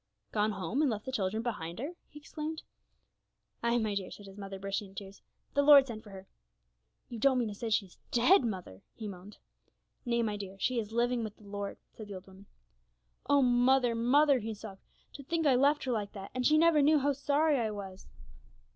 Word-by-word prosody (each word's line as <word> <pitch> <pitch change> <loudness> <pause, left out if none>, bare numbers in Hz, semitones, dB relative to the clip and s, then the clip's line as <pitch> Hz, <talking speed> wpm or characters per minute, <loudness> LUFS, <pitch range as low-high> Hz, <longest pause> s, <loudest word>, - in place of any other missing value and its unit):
'Gone 215 0 +1
home, 195 - -2
and 300 - +3
left 215 -2 -4
the 260 - -4
children 215 -2 -1
behind 175 -8 -4
her!' 285 +9 -4 0.2
he 295 - -14
exclaimed. 305 +1 -6 1.0
'Ay, 235 0 +2
my 220 -3 0
dear,' 195 -2 -3
said 205 - -11
his 195 -1 -12
mother, 195 -1 -7
bursting 195 +1 -4
into 195 +1 -8
tears; 195 0 -14 0.3
'the 285 - +3
Lord 285 -1 +8
sent 230 -4 -7
for 210 - -13
her.' 190 -1 -10 0.8
'You 235 - -6
don't 265 +2 +4
mean 235 -3 0
to - - -6
say 225 +3 -5
she's 200 -4 -1
dead, 255 +9 +5
mother!' 185 - -5
he 220 - -6
moaned. 195 +1 -10 0.7
'Nay, 235 -1 0
my 210 -2 -2
dear, 195 -1 -8
she 245 +4 0
is 215 -1 -5
living 240 +1 +1
with 215 -2 -7
the - - -19
Lord,' 200 0 -5 0.2
said 215 - -9
the 200 - -7
old 185 0 -9
woman. 195 +1 -16 0.8
'Oh, 285 -1 +5
mother, 245 0 +3
mother,' 265 +4 +4
he 220 0 -5
sobbed, 200 -2 -10 0.3
'to 285 - -9
think 325 +3 -1
I 280 - +5
left 285 +4 +3
her 260 - -2
like 210 -3 -2
that, 195 -1 -8
and 250 -1 +1
she 305 - +4
never 325 -2 +5
knew 305 +2 +5
how 285 0 +1
sorry 290 +1 +2
I 225 -2 0
was!' 195 -2 -8
225 Hz, 215 wpm, -31 LUFS, 200-270 Hz, 1.0 s, Lord